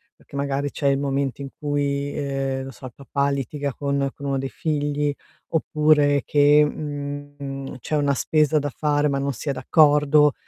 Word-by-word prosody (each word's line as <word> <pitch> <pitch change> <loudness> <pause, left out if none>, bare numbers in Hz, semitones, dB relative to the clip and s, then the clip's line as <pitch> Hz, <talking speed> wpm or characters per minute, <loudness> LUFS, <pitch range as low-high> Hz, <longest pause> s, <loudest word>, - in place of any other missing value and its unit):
perché - - -15
magari 140 0 -1
c'è 140 - -1
il 135 0 +3
momento 140 -1 -1
in 135 - -5
cui, 145 -1 -1
ehm, 135 -2 -2
non 135 - -7
so, 130 - -12
il 125 - -7
papà 140 0 -1
litiga 140 0 -3
con 140 -1 -1
con 140 - -9
1 135 -1 0
dei 135 0 -3
figli 145 -1 -1 0.4
oppure 150 -2 +3
che, 145 +1 +5
mhmm, 145 -2 -5
c'è 155 - -3
una 145 -1 +2
spesa 155 +2 +2
da 145 0 -2
fare 150 -1 +1
ma 140 0 0
non 140 0 -1
si 140 +5 -5
è - - +3
d'accordo 150 +2 +4
140 Hz, 180 wpm, -23 LUFS, 140-145 Hz, 0.4 s, che